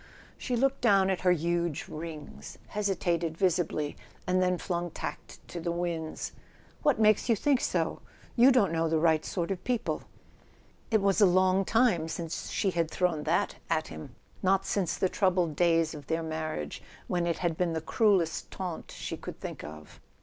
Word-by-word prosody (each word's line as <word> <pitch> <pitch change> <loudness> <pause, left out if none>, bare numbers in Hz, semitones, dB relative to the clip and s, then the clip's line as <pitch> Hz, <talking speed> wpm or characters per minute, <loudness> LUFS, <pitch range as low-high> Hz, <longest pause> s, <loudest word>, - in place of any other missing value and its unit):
She 250 - -2
looked 270 +3 +1
down 195 -5 +4
at 185 - -2
her 180 - +4
huge 170 -1 0
rings, 155 -1 -8
hesitated 175 -5 -1
visibly, 170 -5 0 0.3
and 185 0 +2
then 180 0 +2
flung 175 -1 -2
tact - - -7
to 175 - -5
the 170 +1 -2
winds. 170 -2 -3 0.5
"What 290 -6 +3
makes 215 +2 +4
you 230 - +5
think 275 +3 +2
so? - - 0 0.4
You 250 +3 +7
don't 230 -9 +4
know 165 0 +1
the 160 - +2
right 160 -1 +3
sort 175 -1 -2
of 185 -1 -3
people." 245 -3 -1 0.9
It 220 -3 +2
was 195 +2 +3
a 200 - +8
long 185 +1 +3
time 225 -9 +3
since 165 0 -4
she 195 - 0
had 170 -2 0
thrown 165 -5 0
that 160 +2 +1
at 160 -1 0
him: 80 -1 -9 0.3
not 195 +1 +2
since 180 -5 0
the 190 - +2
troubled 180 -4 +1
days 165 -1 +3
of 145 -3 -10
their 165 0 -1
marriage, 155 - -4 0.2
when 175 -1 0
it 170 - 0
had 170 -2 0
been 175 0 0
the 160 - -1
cruellest 185 -2 +2
taunt 180 -4 -5
she - - -5
could - - -8
think - - -6
of. 75 0 -10
175 Hz, 180 wpm, -29 LUFS, 160-195 Hz, 0.9 s, a